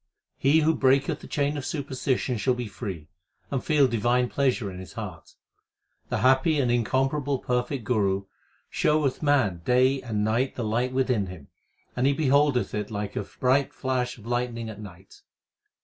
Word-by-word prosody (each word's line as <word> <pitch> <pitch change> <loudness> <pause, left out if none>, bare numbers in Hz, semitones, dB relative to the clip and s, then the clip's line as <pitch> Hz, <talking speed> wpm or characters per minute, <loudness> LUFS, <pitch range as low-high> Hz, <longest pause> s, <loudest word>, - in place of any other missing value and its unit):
He 145 +4 +4
who 160 +1 +3
breaketh 140 +2 +2
the - - -11
chain 145 0 -1
of 145 - -4
superstition 130 -3 -2
shall 125 +5 +1
be 125 0 -4
free, 95 -7 -7 0.4
and 135 -3 -1
feel 150 -4 +4
divine 120 +1 +1
pleasure 130 -7 0
in 90 - -8
his 95 - -10
heart. - - -8 0.7
The - - -1
happy 135 +4 +4
and 125 -3 +2
incomparable 135 +5 +1
perfect 125 +1 -2
Guru 100 -4 0 0.4
showeth 150 -3 +1
man 130 - +2
Day 130 +5 +3
and 110 -4 -2
night 115 +5 0
the 120 - -3
light 120 +4 0
within 125 -6 +1
him, 85 -7 -10 0.5
and 125 +2 +2
he 140 - +3
beholdeth 140 -2 +2
it 105 -1 -3
Like 105 -2 -4
a - - -1
bright 130 +6 0
flash 125 -2 -2
of 110 - -15
lightning 120 -1 -2
at 105 -1 -9
night. 95 -2 -13
125 Hz, 165 wpm, -26 LUFS, 110-135 Hz, 0.7 s, He